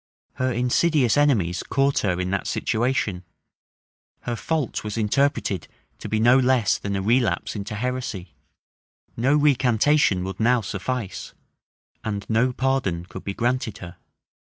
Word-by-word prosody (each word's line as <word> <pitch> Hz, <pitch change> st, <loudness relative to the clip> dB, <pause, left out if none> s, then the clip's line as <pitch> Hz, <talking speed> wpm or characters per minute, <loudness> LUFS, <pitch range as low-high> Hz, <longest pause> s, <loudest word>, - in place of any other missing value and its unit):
Her 130 Hz, 0 st, 0 dB
insidious 125 Hz, +2 st, +2 dB
enemies 115 Hz, -, +2 dB
caught 140 Hz, 0 st, +1 dB
her 90 Hz, -3 st, 0 dB
in 90 Hz, 0 st, -2 dB
that 100 Hz, -, -2 dB
situation: 110 Hz, -6 st, -1 dB, 1.0 s
her 120 Hz, -, -3 dB
fault 155 Hz, +1 st, -2 dB
was 105 Hz, +1 st, -5 dB
interpreted 110 Hz, -4 st, 0 dB, 0.3 s
to -, -, -7 dB
be 110 Hz, -, 0 dB
no 120 Hz, +4 st, +5 dB
less 125 Hz, -4 st, +2 dB
than 100 Hz, -1 st, -3 dB
a 95 Hz, -, -2 dB
relapse 120 Hz, +3 st, +1 dB
into 105 Hz, +1 st, -5 dB
heresy: 110 Hz, -, -4 dB, 0.8 s
no 130 Hz, +5 st, +2 dB
recantation 135 Hz, -6 st, +3 dB
would 95 Hz, 0 st, -6 dB
now 120 Hz, +2 st, +3 dB
suffice; 105 Hz, +1 st, -4 dB, 0.7 s
and 100 Hz, -2 st, -4 dB
no 115 Hz, +3 st, +2 dB
pardon 125 Hz, -10 st, -1 dB
could 90 Hz, -, -9 dB
be 100 Hz, -, -4 dB
granted 120 Hz, -3 st, -1 dB
her. 90 Hz, -6 st, -10 dB
115 Hz, 135 wpm, -23 LUFS, 100-130 Hz, 1.0 s, no